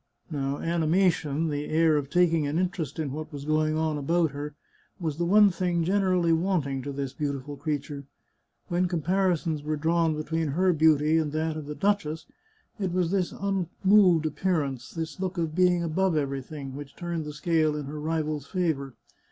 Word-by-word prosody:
Now 140 Hz, -1 st, -2 dB
animation, 165 Hz, -2 st, +1 dB
the 145 Hz, 0 st, -2 dB
air 160 Hz, 0 st, +3 dB
of 145 Hz, -2 st, -1 dB
taking 165 Hz, -3 st, +3 dB
an 145 Hz, +3 st, -1 dB
interest 175 Hz, -5 st, -2 dB
in 155 Hz, -4 st, -2 dB
what 155 Hz, +3 st, -6 dB
was 145 Hz, -1 st, -7 dB
going 155 Hz, 0 st, +1 dB
on 155 Hz, -2 st, 0 dB
about 165 Hz, +2 st, +1 dB
her, 145 Hz, +1 st, -6 dB, 0.4 s
was 160 Hz, -4 st, -3 dB
the 170 Hz, -, +1 dB
one 205 Hz, +2 st, +6 dB
thing 175 Hz, -1 st, 0 dB
generally 185 Hz, -2 st, +2 dB
wanting 160 Hz, -6 st, 0 dB
to 140 Hz, -, -5 dB
this 135 Hz, -1 st, -4 dB
beautiful 145 Hz, -1 st, -4 dB
creature. 145 Hz, -1 st, -4 dB, 0.6 s
When 180 Hz, +1 st, +1 dB
comparisons 175 Hz, -2 st, 0 dB
were 155 Hz, +1 st, -2 dB
drawn 165 Hz, +1 st, +1 dB
be 155 Hz, -, -3 dB
tween 160 Hz, +1 st, -1 dB
her 185 Hz, +3 st, +3 dB
beauty 155 Hz, 0 st, +4 dB
and 155 Hz, -2 st, -1 dB
that 155 Hz, 0 st, -1 dB
of 155 Hz, -2 st, -6 dB
the 150 Hz, -, -5 dB
duchess, 195 Hz, -6 st, 0 dB, 0.5 s
it 190 Hz, -3 st, -1 dB
was 180 Hz, -1 st, 0 dB
this 190 Hz, -3 st, 0 dB
un 195 Hz, -3 st, -2 dB, 0.2 s
moved 190 Hz, -5 st, +5 dB
appearance, 150 Hz, -5 st, -1 dB
this 160 Hz, -2 st, -5 dB
look 190 Hz, 0 st, -3 dB
of 165 Hz, -2 st, -1 dB
being 180 Hz, 0 st, +3 dB
above 170 Hz, +1 st, +1 dB
everything, 140 Hz, -1 st, -4 dB
which 145 Hz, -1 st, -9 dB
turned 170 Hz, -2 st, -3 dB
the 150 Hz, -, -6 dB
scale 155 Hz, 0 st, +1 dB
in 150 Hz, -1 st, -4 dB
her 150 Hz, +2 st, -6 dB
rival's 155 Hz, -2 st, -2 dB
favour. 150 Hz, -8 st, -1 dB
160 Hz, 180 wpm, -27 LUFS, 150-175 Hz, 0.6 s, one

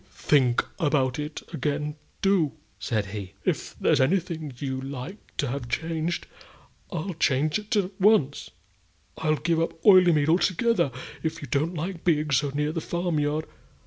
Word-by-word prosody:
"Do -, -, -30 dB
think 130 Hz, -5 st, +2 dB
about 145 Hz, -5 st, +1 dB
it 150 Hz, +1 st, -5 dB
again 150 Hz, +2 st, -2 dB, 0.3 s
do!" 190 Hz, -7 st, +3 dB, 0.3 s
said 105 Hz, +1 st, -1 dB
he. 100 Hz, -1 st, -7 dB
"If -, -, -1 dB
there's -, -, +3 dB
anything 160 Hz, 0 st, 0 dB
you 130 Hz, -1 st, -3 dB
like 135 Hz, -, -6 dB, 0.2 s
to -, -, +1 dB
have 125 Hz, -2 st, -4 dB
changed, 160 Hz, +7 st, -2 dB, 0.7 s
I'll 180 Hz, +1 st, -3 dB
change 150 Hz, +1 st, +1 dB
it 215 Hz, +2 st, -3 dB
at 195 Hz, -2 st, +1 dB
once. 185 Hz, -9 st, +3 dB, 0.7 s
I'll 155 Hz, -1 st, +2 dB
give 160 Hz, +3 st, 0 dB
up 165 Hz, 0 st, -2 dB
Oileymead 175 Hz, -7 st, +6 dB
altogether, 185 Hz, -, +2 dB, 0.3 s
if 160 Hz, -2 st, -3 dB
you -, -, -6 dB
don't 155 Hz, +8 st, 0 dB
like 165 Hz, +2 st, -4 dB
being 155 Hz, -3 st, +2 dB
so 140 Hz, +2 st, +2 dB
near 150 Hz, +2 st, -1 dB
the 165 Hz, 0 st, -3 dB
farm 175 Hz, -2 st, -1 dB
yard. 150 Hz, +1 st, 0 dB
155 Hz, 155 wpm, -26 LUFS, 140-170 Hz, 0.7 s, Oileymead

